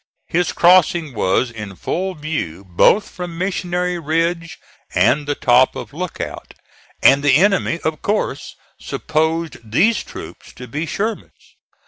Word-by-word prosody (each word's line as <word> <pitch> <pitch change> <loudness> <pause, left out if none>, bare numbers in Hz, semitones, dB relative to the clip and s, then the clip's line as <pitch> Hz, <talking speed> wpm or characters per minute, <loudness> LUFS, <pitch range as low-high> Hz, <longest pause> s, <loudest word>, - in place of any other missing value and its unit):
His 175 +1 0
crossing 175 -4 +4
was 110 +3 +1
in 105 -4 -8
full 185 - -3
view 150 - -4
both 95 - +3
from 175 -2 -7
Missionary 180 -1 -2
Ridge 165 +2 -1 0.4
and 145 0 +3
the 145 - 0
top 125 0 +3
of - - -8
Lookout, 180 +4 -6 0.5
and 140 +1 +6
the 145 -2 +4
enemy 195 -2 +2
of 160 -1 -2
course 210 +1 -2 0.2
supposed 160 +1 -1
these 185 - +2
troops - - -11
to 125 - -10
be 150 +7 -4
Sherman's. 220 +6 -5
165 Hz, 130 wpm, -19 LUFS, 140-180 Hz, 0.5 s, and